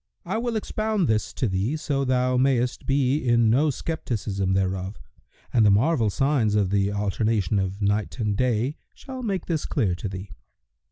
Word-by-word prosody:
I 195 +6 -1
will 240 -1 -2
expound 215 -3 -1
this 110 -1 0
to 125 - -1
thee, 100 +10 -1
so 140 -2 -1
thou 130 -1 +1
mayst 125 -1 +1
be 135 0 +2
in 120 -4 +3
no 145 +6 +3
scepticism 110 - -2
thereof, 95 +1 -1 0.5
and 115 - +4
the 105 - +6
marvel 115 +3 +3
signs 125 -2 +1
of 100 -3 +1
the 100 0 +2
alternation 105 0 0
of 95 +2 -3
Night 105 +4 0
and 105 -4 0
Day 125 +5 0 0.2
shall 260 -2 -8
make 200 -6 -2
this 160 -3 -2
clear 105 -11 0
to 95 +3 -4
thee. 95 +1 -7
120 Hz, 170 wpm, -25 LUFS, 100-140 Hz, 0.5 s, the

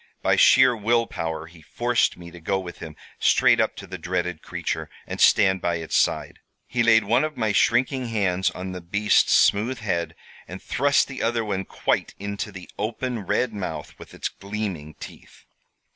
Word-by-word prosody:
By - - +3
sheer 130 -1 +6
will 115 +2 +1
power 80 -5 -4
he 85 0 -16
forced 120 +8 0
me 85 -1 -11
to 85 - -12
go 95 +4 -1
with 90 -2 -8
him 80 -2 -9 0.2
straight - - +4
up - - +1
to - - -9
the 95 -1 -8
dreaded 90 -1 -3
creature, 80 -1 -4 0.2
and - - -5
stand 95 -3 +5
by 85 -1 0
its 80 -1 -4
side. - - 0 0.3
He 125 - -1
laid 115 -1 +5
one 120 +7 +2
of 155 -1 -4
my 110 -3 +1
shrinking 125 +4 +2
hands 95 -5 0
on 95 0 -6
the 90 -1 -7
beast's 100 +5 +2
smooth 115 +5 +3
head, 90 -7 -2 0.3
and 90 +1 -8
thrust 140 +7 +2
the 135 -1 -7
other 115 0 0
one 95 -2 -2
quite - - -1
into 100 +1 -5
the 95 -2 -10
open 120 +3 -3
red 125 -3 0
mouth 100 -3 -5
with - - -12
its - - -2
gleaming 100 -7 -6
teeth. - - -13
100 Hz, 185 wpm, -24 LUFS, 90-115 Hz, 0.3 s, sheer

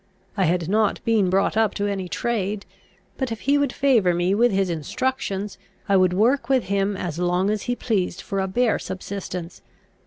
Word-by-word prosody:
I - - +2
had 170 0 +1
not 215 +2 +2
been 215 -5 +3
brought 195 +3 +2
up 220 -2 +2
to 205 - -1
any 195 -3 -2
trade; 210 -3 -2 0.5
but, 260 -3 -1
if 225 - -5
he 280 +2 +2
would 285 -3 +1
favour 230 -12 +3
me 175 +2 +1
with 235 +3 +3
his 195 -1 +1
instructions, 195 - -3 0.3
I 200 - +3
would 185 -1 +4
work 235 +6 +2
with 265 -2 +3
him 200 0 0
as 170 -3 -4
long 180 +3 +1
as 215 -1 -1
he 245 - +1
pleased 200 -9 -1
for 195 -2 -3
a 190 - 0
bare 230 +4 +1
subsistence. 185 -2 -6
200 Hz, 190 wpm, -23 LUFS, 185-225 Hz, 0.5 s, would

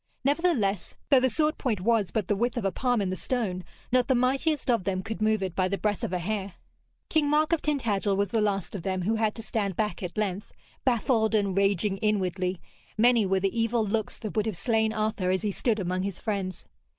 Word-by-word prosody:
Nevertheless, 275 - +1
though 275 -3 +7
the 260 +1 +2
sword 305 +4 0
point 230 -8 0
was 220 -2 +2
but 210 -2 -2
the 205 - +2
width 240 +4 -1
of 230 - -2
a 195 - +2
palm 245 +1 +1
in 190 -2 -1
the - - -1
stone, 190 -5 -2 0.3
not 250 0 +3
the 265 - +3
mightiest 265 +3 +1
of 230 -5 +1
them 190 -1 -1
could 220 +1 -5
move 215 -2 +2
it 185 -3 -3
by 185 -1 +2
the 200 +1 -1
breadth 210 -1 -1
of - - -2
a 180 - 0
hair. 195 +1 -3 0.5
King 305 -3 +2
Mark 305 +2 +3
of 330 - +1
Tintagel 215 -9 0
was 200 -1 +1
the 225 +1 +1
last 200 -3 -1
of 200 - -4
them 185 +1 -2
who 220 +4 +1
had 220 -1 0
to 225 - -6
stand 205 -4 -2
back 210 -3 -2
at 180 0 -6
length, 205 -1 -2 0.3
baffled 230 -3 +2
and 200 -3 +1
raging 195 0 +2
inwardly. 185 -4 0 0.4
Many 230 -2 +4
were 190 0 +2
the 195 +2 0
evil 230 0 +1
looks 215 +1 -2
that 215 -1 -6
would 215 0 +1
have 210 -6 -3
slain 220 -1 +1
Arthur 215 -4 -1
as 185 +2 +1
he 210 - 0
stood 220 +2 0
among 185 -1 -1
his 195 -1 -4
friends. 195 -5 -3
215 Hz, 230 wpm, -27 LUFS, 195-235 Hz, 0.5 s, though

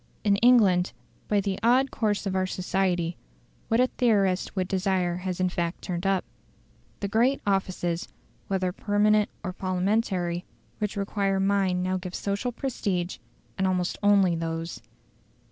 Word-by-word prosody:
In 200 -2 +3
England, 205 -6 +4 0.3
by 210 - +2
the 195 -1 -2
odd 255 +4 +3
course 210 -2 0
of 190 -1 -1
our 185 0 +1
society, 180 -2 -1 0.5
what 225 - +2
a 250 - +6
theorist 200 -9 +1
would 185 -2 0
desire 185 -2 0
has 185 0 -4
in 185 - +2
fact 170 -1 -3
turned 180 +1 -2
up. 195 -2 +1 0.8
The 200 - -1
great 240 +7 +2
offices, 185 -3 -1 0.4
whether 185 -2 0
permanent 210 +2 +2
or 185 -2 -3
Parliamentary, 185 -2 0 0.4
which 210 0 -2
require 195 -1 0
mind 195 -2 +1
now 185 0 0
give 180 0 -6
social 200 +5 -2
prestige, 200 -8 -2 0.4
and 190 - +2
almost 180 -1 0
only 200 -4 +4
those. 165 0 -4
190 Hz, 145 wpm, -26 LUFS, 180-205 Hz, 0.8 s, a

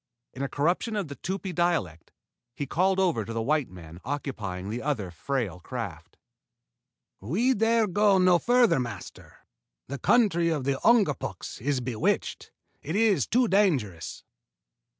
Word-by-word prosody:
In 130 - -7
a 140 - -2
corruption 175 - 0
of 195 -7 -2
the 140 - -6
Tupi 190 0 -4
dialect, 155 - -1 0.4
he 145 - -3
called 185 +7 +1
over 170 - +1
to 115 - -6
the 115 - -2
white 150 +2 +1
man 85 -2 -11
occupying 105 -10 -4
the 120 +2 -3
other 115 -11 -2
frail 110 - -3
craft. 90 -6 -7 1.0
"We 205 - +1
dare 225 0 +3
go 205 +1 +3
no 180 -1 +5
farther, 240 - +4
master. 120 -4 -8 0.4
The 140 0 -5
country 185 -9 +3
of 155 -5 -1
the 135 0 -1
Ungapuks 205 - +1
is 135 0 0
bewitched. 120 -3 -1 0.3
It 160 +5 -4
is 215 -2 +3
too 245 +1 +3
dangerous." 140 - 0
145 Hz, 145 wpm, -27 LUFS, 115-195 Hz, 1.0 s, no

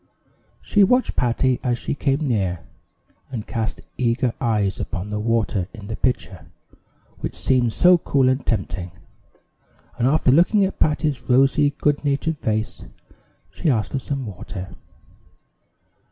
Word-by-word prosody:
She 205 - +4
watched 250 +6 +2
Patty 125 +1 +1
as 120 -2 0
she - - -3
came 140 +1 0
near, 95 -8 0 0.7
and 115 -5 -5
cast 110 -3 -3 0.2
eager 120 0 +1
eyes 105 -5 0
upon 100 -1 -4
the 105 0 -2
water 110 -4 0
in 105 -3 -10
the 110 - -3
pitcher, 90 - -2 0.7
which - - -5
seemed 125 -3 +2
so 180 +8 +5
cool 135 -4 +2
and 130 +1 +1
tempting; 95 -6 -3 1.1
and 120 - +3
after 140 -2 +3
looking 180 - +4
at 190 - -5
Patty's 150 -4 +1
rosy, 135 +3 +4
good 145 0 +1
natured 145 +2 -1
face, 110 0 -2 0.7
she 165 - -1
asked 110 -6 0
for 135 - -1
some 135 0 -3
water. 95 -2 -8
125 Hz, 140 wpm, -22 LUFS, 110-140 Hz, 1.1 s, so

